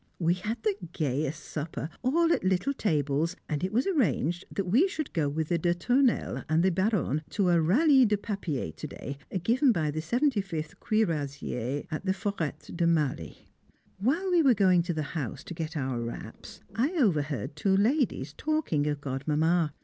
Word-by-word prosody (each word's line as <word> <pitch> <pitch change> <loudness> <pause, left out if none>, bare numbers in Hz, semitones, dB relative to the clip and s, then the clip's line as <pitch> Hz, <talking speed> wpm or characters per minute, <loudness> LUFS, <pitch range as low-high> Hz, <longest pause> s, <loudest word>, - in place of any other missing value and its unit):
We 170 -1 +2
had 210 +5 -4
the 215 - +2 0.2
gayest 150 +1 -2
supper, 155 -1 -4
all 330 +6 +3
at - - -1
little 190 +9 +1
tables; 155 - 0
and 150 +1 -2
it 185 - -1
was 240 +4 +1
arranged 175 - +1
that 195 - -2
we 240 - +4
should 315 -7 -5
go 150 -4 +1
with 155 +2 -2
the 170 -1 +1
de 175 +1 +1
Tournelles, 245 +7 +1
and 160 +2 +3
the 190 - +4
Baronne, 185 - +1
to 195 -3 +1
a 170 -1 +4
Ralli 260 - +5
de 210 0 +2
Papier 190 - -3
to - - -7
day, 140 +1 -7 0.2
given 255 +6 +4
by 155 -8 0
the 155 - -3
75th 195 - -1
Cuirassiers 145 - -1
at 155 - -3
the 190 -1 +1
Forêt 190 -8 -4
de 170 -1 +2
Marly. 150 - -1 0.5
While 320 - +1
we 350 -2 +5
were 265 -6 +5
going 185 -3 +4
to 175 +1 -2
the 155 - -1
house 145 -2 -4
to 175 - -7
get 160 -1 -4
our 130 -3 -2
wraps, 115 0 -8
I 270 +10 0
overheard 150 - 0
two 190 +5 +2
ladies 215 - +1
talking 300 - 0
of 145 -1 -2
Godmamma. 150 +4 +1
175 Hz, 180 wpm, -28 LUFS, 150-220 Hz, 0.5 s, Ralli